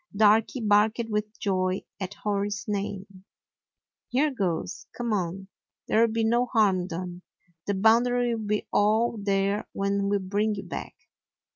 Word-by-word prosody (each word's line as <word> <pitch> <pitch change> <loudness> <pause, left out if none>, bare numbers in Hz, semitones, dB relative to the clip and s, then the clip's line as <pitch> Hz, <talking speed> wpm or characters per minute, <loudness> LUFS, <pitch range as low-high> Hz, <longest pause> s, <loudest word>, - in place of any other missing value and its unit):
Darky 220 +4 +4
barked 210 +1 +3
with 210 0 -2
joy 185 -1 0 0.2
at 195 0 -5
Hori's 205 0 -1
name. 195 -2 -4 0.9
"Here 285 +5 +2
goes. 180 -8 -3
Come 235 -2 -1
on; 190 0 -2 0.4
there 225 - +4
'll 230 - +2
be 225 0 0
no 240 +2 +2
harm 195 -7 +2
done. 180 0 -6 0.5
The 200 - 0
Boundary 240 +4 +3
will 225 -1 -3
be 210 0 -1
all 220 +3 +3
there 200 +1 0
when 200 0 0
we 205 - +2
bring 205 +3 -1
you 195 - -6
back." - - -7
205 Hz, 145 wpm, -26 LUFS, 195-220 Hz, 0.9 s, Darky